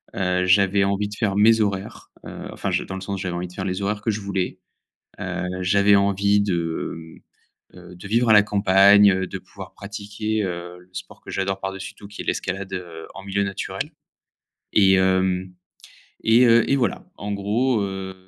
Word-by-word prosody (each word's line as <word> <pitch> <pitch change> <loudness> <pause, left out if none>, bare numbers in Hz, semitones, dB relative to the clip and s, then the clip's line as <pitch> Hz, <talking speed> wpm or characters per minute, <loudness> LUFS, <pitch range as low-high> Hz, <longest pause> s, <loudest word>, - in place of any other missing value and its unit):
Heu, 90 -1 0
j'avais 100 +1 +4
envie 100 +1 0
de 105 - -9
faire 100 -4 -1
mes 110 +2 +5
horaires, 100 -2 -3
heu, - - -8
enfin, - - -3
je - - 0
dans 95 - -7
le 95 - -6
sens 100 0 -4
j'avais 90 -2 -3
envie 90 +1 -3
de 90 - -15
faire 95 0 -5
les 95 +1 -2
horaires 105 +1 -2
que 110 - 0
je 105 - -3
voulais. 95 -2 -3 0.6
Heu, - - -3 0.2
j'avais 100 +2 +4
envie 100 +1 +2
de, 85 -4 -2 0.8
mmh, - - -16
heu, 90 0 -13
de 100 - -10
vivre 115 +2 +2
à - - +8
la 105 - +8
campagne, 100 0 +6
heu, 95 0 -1
de 95 - -6
pouvoir 95 +1 -12
pratiquer, 105 +2 -4
heu, 90 0 -5
le 90 - -21
sport 90 - -9
que - - -10
j'adore 95 0 -2
par-dessus 95 0 -6
tout, 100 - -13
qui 100 - -7
est - - -13
l'escalade, 95 0 -3
heu, 85 -3 -7
en 95 - -10
milieu 100 0 -1
naturel, 100 -1 -4 0.8
et 95 -2 +5
hem, 95 -1 +1 0.7
et 115 +3 +5
heu, 115 0 +5
et 140 - +4
voilà. 120 -7 -1
En 105 0 -5
gros, 110 +5 0
heu, 95 -1 -5
100 Hz, 195 wpm, -23 LUFS, 95-105 Hz, 0.8 s, à